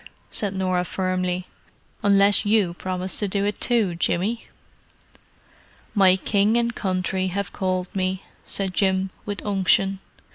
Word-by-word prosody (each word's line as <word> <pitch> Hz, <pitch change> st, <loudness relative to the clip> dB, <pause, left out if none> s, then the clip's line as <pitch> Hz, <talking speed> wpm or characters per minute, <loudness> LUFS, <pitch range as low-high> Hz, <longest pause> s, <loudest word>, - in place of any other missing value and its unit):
said 200 Hz, -2 st, -2 dB
Norah 185 Hz, -1 st, 0 dB
firmly. 185 Hz, 0 st, -2 dB, 0.6 s
"Unless 200 Hz, -1 st, +4 dB
you 205 Hz, -4 st, +2 dB
promise 185 Hz, +1 st, -2 dB
to 205 Hz, -, 0 dB
do 200 Hz, +1 st, 0 dB
it 205 Hz, -, -2 dB
too, 225 Hz, -7 st, +2 dB
Jimmy." 190 Hz, +6 st, -1 dB, 1.5 s
"My 190 Hz, -3 st, +5 dB
King 205 Hz, +3 st, +2 dB
and 235 Hz, 0 st, +1 dB
Country 185 Hz, -1 st, -1 dB
have 195 Hz, +1 st, -3 dB
called 185 Hz, 0 st, -2 dB
me," 185 Hz, 0 st, -1 dB, 0.2 s
said 195 Hz, -2 st, -2 dB
Jim, 190 Hz, -1 st, +1 dB, 0.2 s
with 205 Hz, -1 st, -5 dB
unction. 195 Hz, -1 st, +2 dB
190 Hz, 130 wpm, -23 LUFS, 185-205 Hz, 1.5 s, My